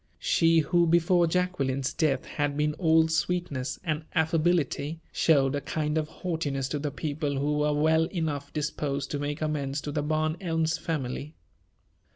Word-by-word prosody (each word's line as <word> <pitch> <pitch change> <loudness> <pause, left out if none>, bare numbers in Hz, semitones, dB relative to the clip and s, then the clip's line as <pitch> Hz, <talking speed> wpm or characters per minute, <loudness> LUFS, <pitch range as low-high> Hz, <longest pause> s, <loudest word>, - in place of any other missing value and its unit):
She, 165 -1 +3
who 170 +3 +2
before 170 +1 +4
Jacqueline's 140 -7 0
death 150 -6 +1
had 145 -1 -2
been 150 0 +1
all 160 -2 +4
sweetness 160 -6 -1
and 155 -3 -2
affability, 160 -2 +1
showed 140 -4 +3
a 145 - -1
kind 150 0 -2
of 155 -1 0
haughtiness 150 -7 -3
to 150 - -2
the 145 +1 -2
people 145 0 -3
who 150 +2 0
were 150 0 +2
well 160 +2 +3
enough 155 -5 -3
disposed 145 -2 -2
to 145 - -2
make 145 +1 -3
amends 145 -2 -1
to 150 - -5
the 150 0 -1
Barn 155 +2 0
Elms 165 -3 0
family. 150 -2 -4
155 Hz, 160 wpm, -27 LUFS, 145-160 Hz, -, before